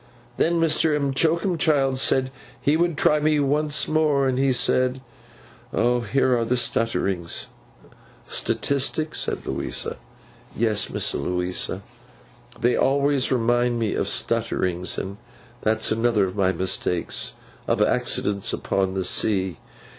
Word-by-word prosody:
'Then 170 +1 +2
Mr. 160 -2 +2
M'Choakumchild 145 -1 +1
said 130 0 +2 0.3
he 145 - +2
would 170 -1 +1
try 150 0 +3
me 150 0 +2
once 145 0 +1
more. 150 -3 +2
And 130 0 0
he 135 0 +3
said, 130 +1 +2 0.7
Here 125 +2 +1
are 120 - 0
the 125 +2 0
stutterings—' 100 -7 0 0.8
'Statistics,' 140 +3 -1
said - - -1
Louisa. - - -3 0.6
'Yes, 110 -2 +1
Miss - - -1
Louisa—they 90 +6 -4
always 140 0 +1
remind 120 0 +1
me 115 -3 -1
of - - -1
stutterings, 90 0 -1
and 100 +1 -5 0.4
that's 110 0 +1
another 115 -1 +2
of 95 0 -6
my 95 -2 +2
mistakes—of 90 -1 -2
accidents 100 -1 +1
upon 95 -1 -1
the 95 - -1
sea. 95 -2 0
125 Hz, 115 wpm, -23 LUFS, 105-145 Hz, 0.8 s, try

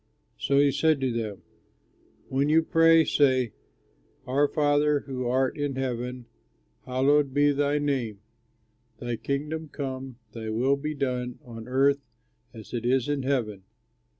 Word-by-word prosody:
So 140 - +1
he 140 0 +5
said 155 0 +2
to 130 -1 +1
them, 110 -4 -4 0.8
"When 140 +2 0
you 160 +1 +4
pray, 165 -1 +5
say: 130 -6 +2 0.7
'Our 140 +4 +2
Father 145 -1 +2
who 130 -2 -4
art 130 +1 +1
in 145 -2 -1
heaven, 125 -1 -3 0.6
hallowed 135 +2 +2
be 145 0 +4
thy 145 +1 +1
name, 130 -8 -1 0.8
thy 120 0 -3
kingdom 150 +6 -3
come, 130 -3 -5
thy 110 0 -6
will 125 +6 +2
be 150 +2 -4
done 125 -3 -2
on 115 -1 -9
earth 140 +2 +2 0.5
as 110 0 -12
it 120 -2 -2
is 125 +1 +2
in 145 -1 -1
heaven. 120 -7 -1
135 Hz, 140 wpm, -26 LUFS, 125-145 Hz, 0.8 s, he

